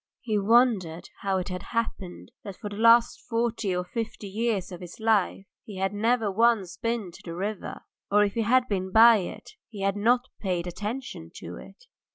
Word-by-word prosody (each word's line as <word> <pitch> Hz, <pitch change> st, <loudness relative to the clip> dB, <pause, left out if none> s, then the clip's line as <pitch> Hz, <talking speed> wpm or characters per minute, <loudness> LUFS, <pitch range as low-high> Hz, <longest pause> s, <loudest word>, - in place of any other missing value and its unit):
He 220 Hz, -4 st, 0 dB
wondered 200 Hz, -6 st, +2 dB
how 195 Hz, -1 st, 0 dB
it 185 Hz, +1 st, -3 dB
had 180 Hz, -1 st, -4 dB, 0.2 s
happened 200 Hz, -5 st, -3 dB
that 200 Hz, -3 st, -8 dB
for 210 Hz, -, -6 dB
the -, -, -6 dB
last 230 Hz, +2 st, +5 dB
forty 230 Hz, -4 st, 0 dB
or 180 Hz, 0 st, -2 dB
fifty 220 Hz, +1 st, -5 dB
years 210 Hz, -2 st, -1 dB
of 180 Hz, -, -8 dB
his 175 Hz, +3 st, -10 dB
life 215 Hz, -3 st, +1 dB, 0.2 s
he 205 Hz, -3 st, -9 dB
had 190 Hz, +1 st, -1 dB
never 225 Hz, 0 st, +1 dB
once 220 Hz, -3 st, +2 dB
been 230 Hz, -5 st, -2 dB
to -, -, -14 dB
the 170 Hz, -1 st, -7 dB
river, 200 Hz, +3 st, -4 dB, 0.3 s
or 210 Hz, +1 st, +5 dB
if 200 Hz, -1 st, 0 dB
he 230 Hz, -, 0 dB
had 250 Hz, +3 st, +3 dB
been 190 Hz, -2 st, -2 dB
by 225 Hz, +2 st, +8 dB
it 190 Hz, -, -6 dB, 0.2 s
he 210 Hz, -4 st, -8 dB
had 195 Hz, 0 st, +1 dB
not 240 Hz, +4 st, +2 dB
paid 180 Hz, -4 st, -1 dB
attention 210 Hz, +9 st, -5 dB
to -, -, -8 dB
it. -, -, -14 dB
210 Hz, 195 wpm, -27 LUFS, 190-230 Hz, 0.3 s, by